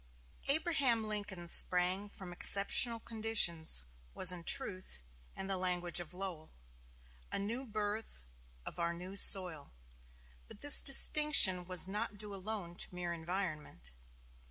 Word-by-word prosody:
Abraham 280 -6 +1
Lincoln 205 -5 -7
sprang 180 +3 +3
from 185 -3 -11
exceptional 215 +6 +3
conditions 215 - +1 0.3
was 180 - +2
in 175 -2 -9
truth, 185 - -4 0.3
in 190 - -6
the 195 -1 -6
language 180 -1 -4
of 175 -3 -11
Lowell, 180 -4 -9 0.8
a - - -3
"new 230 +7 -7
birth 210 - -7 0.4
of - - -11
our 170 0 -5
new 180 +3 -12
soil." 180 -7 +3 0.7
But - - -18
this 290 -1 +8
distinction 275 -10 +4
was 180 0 +1
not 210 +1 -6
due 205 0 -8
alone 195 -3 -9
to - - -5
mere 175 -1 -7
environment. 160 - -8
190 Hz, 130 wpm, -31 LUFS, 175-215 Hz, 0.8 s, this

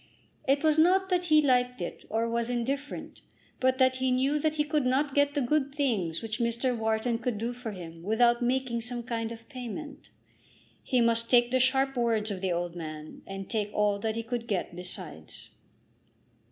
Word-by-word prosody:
It 280 +2 +3
was 310 0 +4
not 380 +4 +4
that 360 -1 +1
he 310 -2 +5
liked 250 -3 +2
it, 175 - -6
or 225 +2 0
was 235 0 -1
indifferent, 270 +4 -3 0.4
but 260 0 +2
that 260 -1 +3
he 260 0 0
knew 265 +4 +2
that 310 +1 0
he 300 - +2
could 300 -1 0
not 270 +3 +1
get 285 +1 +2
the 290 - +1
good 280 +2 0
things 210 - 0
which 220 +1 -4
Mr. 235 +2 0
Wharton 225 +1 0
could 235 -2 -2
do 230 +3 -2
for 245 -1 -6
him 170 -5 -8
without 235 +5 +3
making 245 -1 0
some 240 0 -4
kind 230 -2 -3
of 230 0 -10
payment. 275 +2 -8 0.7
He 250 -2 +1
must 230 0 +2
take 240 -1 +5
the 260 - +3
sharp 265 +1 +3
words 225 -3 +1
of 190 -2 -4
the 190 -2 0
old 175 0 -2
man, 155 -2 -7
and 195 0 -6
take 210 -2 -1
all 205 -1 +2
that 220 +1 -2
he 230 - -3
could 235 0 -4
get 190 -4 -2
besides. 180 - -7
240 Hz, 195 wpm, -29 LUFS, 220-265 Hz, 0.7 s, he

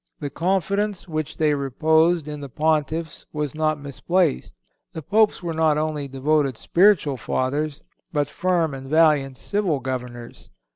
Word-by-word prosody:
The 145 -2 -5
confidence 195 +3 -1
which 155 -3 -4
they 155 -1 +2
reposed 160 +4 +2
in 150 -1 -6
the 140 - -7
Pontiffs 155 +2 -1
was 150 -3 -3
not 155 -1 0
misplaced. 140 - -1 0.4
The 160 - -6
Popes 215 +2 +2
were 170 -1 -2
not 160 -2 +2
only 150 -2 -2
devoted 135 -1 0
spiritual 170 - +3
Fathers, 140 +5 -2 0.3
but 145 -3 0
firm 170 -2 0
and 135 0 -8
valiant 150 -4 +3
civil 195 -8 -1
Governors. 125 -2 -6
155 Hz, 140 wpm, -23 LUFS, 140-165 Hz, 0.4 s, spiritual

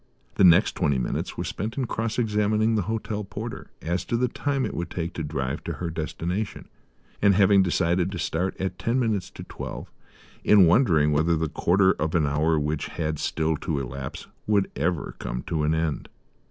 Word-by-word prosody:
The - - +2
next 85 -3 +6
twenty 70 -2 +1
minutes 60 - -3
were - - -2
spent 110 +6 -4
in 135 - 0
cross 115 -1 -2
examining 110 -1 +2
the 110 - +2
hotel 110 -1 -2
porter 110 +4 -7
as 85 +2 -1
to 115 - 0
the 125 +1 +2
time 135 +2 -1
it - - -4
would 85 -1 -4
take 85 0 -4
to 80 - -4
drive 70 -3 -3
to - - -2
her 85 -2 -4
destination, 85 +5 -4 0.5
and, 100 -1 +5
having 100 0 +5
decided 90 0 +1
to 95 - -4
start 85 +3 -2
at 95 0 -3
ten 120 +3 0
minutes 110 -7 0
to - - -10
twelve, - - -7 0.5
in 100 -3 +7
wondering 85 - +4
whether 80 +3 +2
the 80 0 -1
quarter 95 +5 +3
of 80 +1 0
an 80 -3 +3
hour 75 +3 +2
which 75 0 -2
had 75 -2 -3
still 80 0 0
to 80 -1 -2
elapse 70 0 -6 0.2
would 100 -2 +2
ever 80 +4 -1
come - - -4
to 80 -2 -2
an 75 +1 +2
end. 80 -2 -2
85 Hz, 195 wpm, -25 LUFS, 80-105 Hz, 0.5 s, in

